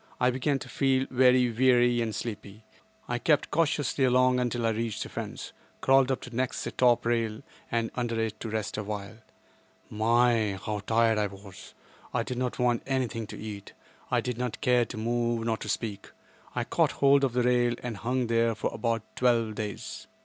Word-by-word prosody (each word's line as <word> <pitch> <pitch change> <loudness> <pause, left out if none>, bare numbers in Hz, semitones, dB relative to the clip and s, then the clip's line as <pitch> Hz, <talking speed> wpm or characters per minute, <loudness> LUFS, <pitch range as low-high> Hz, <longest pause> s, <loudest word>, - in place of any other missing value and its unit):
I 125 0 +3
began 135 +3 0
to - - -9
feel 135 -1 +1
very 125 -1 +4
weary 120 0 +3
and 110 -3 -2
sleepy. 105 -2 -6 0.4
I 120 0 -1
crept 150 +3 +2
cautiously 150 -4 +1
along 130 0 +4
until 120 -1 -1
I 115 - +3
reached 110 -1 -2
the - - -9
fence; - - -6 0.3
crawled 135 -1 +4
up 130 - -1
to 125 -1 -9
next 130 +1 -1
the - - -4
top 120 -2 +3
rail 115 -2 0 0.3
and 115 -1 0
under 120 -2 -2
it 110 -1 -2
to 115 - -5
rest 110 -1 -3
awhile. 105 0 -5 0.7
My, 115 -1 +2
how 105 -1 -2
tired 115 +1 +2
I 105 - +1
was! 100 -1 -12 0.4
I - - +1
did 125 -1 -4
not 125 -1 -2
want 120 -1 +1
anything 125 -5 -1
to - - -8
eat. 105 -2 -8 0.4
I - - +2
did 125 -1 -4
not 125 -2 -3
care 125 -1 +3
to 115 - -8
move, 120 0 -1
nor 115 -1 0
to 105 - -7
speak. 105 -1 -3 0.5
I - - 0
caught - - +1
hold 140 0 +4
of 130 -3 +1
the 125 0 +1
rail 120 -1 +2
and 120 -4 -4
hung 125 +4 -1
there 115 0 +2
for 110 - -2
about 115 -2 -1
twelve 115 -3 +2
days. 105 -1 -6
120 Hz, 190 wpm, -28 LUFS, 110-125 Hz, 0.7 s, very